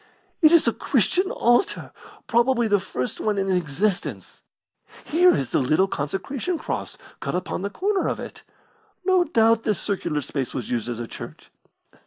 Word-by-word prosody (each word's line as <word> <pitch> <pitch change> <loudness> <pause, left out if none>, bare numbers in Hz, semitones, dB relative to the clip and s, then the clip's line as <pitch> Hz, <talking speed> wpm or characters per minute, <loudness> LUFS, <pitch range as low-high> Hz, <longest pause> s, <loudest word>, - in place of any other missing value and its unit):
"It 310 -2 +7
is 335 -7 +5
a 230 - +3
Christian 355 - +1
altar 240 - +1 0.3
probably 240 0 +2
the 205 -1 +3
first 125 -9 -4
one 210 -2 0
in 195 -1 0
existence. 180 +3 -2 0.6
Here 355 +4 +4
is 135 - -2
the - - +2
little 155 +8 +2
consecration 195 - -3
cross - - -5 0.2
cut - - -3
upon 180 - -3
the 200 - -2
corner 390 - 0
of - - -2
it. - - -8 0.6
No 370 -1 +4
doubt 225 -3 +3
this 215 -4 0
circular 170 -7 -2
space 135 -1 -4
was 125 -5 -4
used 120 -1 -1
as 120 -1 -4
a 120 - -3
church." - - -10
210 Hz, 165 wpm, -24 LUFS, -, 0.6 s, It